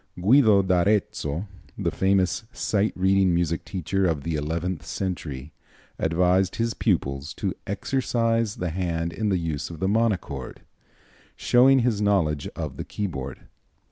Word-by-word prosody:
Guido 105 0 +5
d'Arezzo, 90 -3 +1 0.3
the - - -1
famous 95 +2 +1
sight 105 -3 0
reading 95 -1 +3
music 85 -1 0
teacher 95 +1 -1
of 75 -5 -1
the 85 - -2
eleventh 80 +2 -2
century, 80 -4 -5 0.5
advised 90 +3 +2
his 115 0 0
pupils 70 +2 -1
to - - -2
"exercise 115 +1 0
the 90 -2 -3
hand 85 -1 -2
in 110 -1 -1
the 95 - +2
use 80 -4 -3
of 85 -2 -9
the 95 - 0
monochord," 110 -1 -1 0.7
showing 130 +2 +5
his 115 -4 +1
knowledge 85 -8 +1
of - - -5
the - - -4
keyboard. 70 -10 -5
95 Hz, 135 wpm, -25 LUFS, 80-105 Hz, 0.7 s, Guido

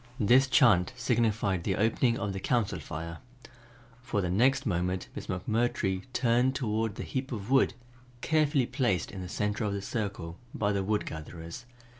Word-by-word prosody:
This 125 +5 +5
chant 110 - +4
signified 110 -6 +1
the - - 0
opening 115 +3 +2
of 100 0 -2
the 95 - -4
Council 115 0 0
Fire. 85 +1 -6 0.8
For 125 -4 -2
the 90 -3 -1
next 125 +8 +3
moment 90 -2 -1
Miss - - -7
McMurtry 95 -1 -1
turned 125 +1 +2
toward 110 -4 -1
the - - -5
heap 130 0 -4
of 110 0 -5
wood 135 -1 +4 0.5
carefully 150 -4 +2
placed 120 -8 0
in 95 - -7
the 90 - -6
center 105 +4 -1
of 105 -1 -1
the 100 - -3
circle, 100 -6 -4 0.2
by 105 -1 +1
the 100 -1 0
wood 105 +2 0
gatherers. 80 +7 -8
105 Hz, 165 wpm, -29 LUFS, 95-120 Hz, 0.8 s, This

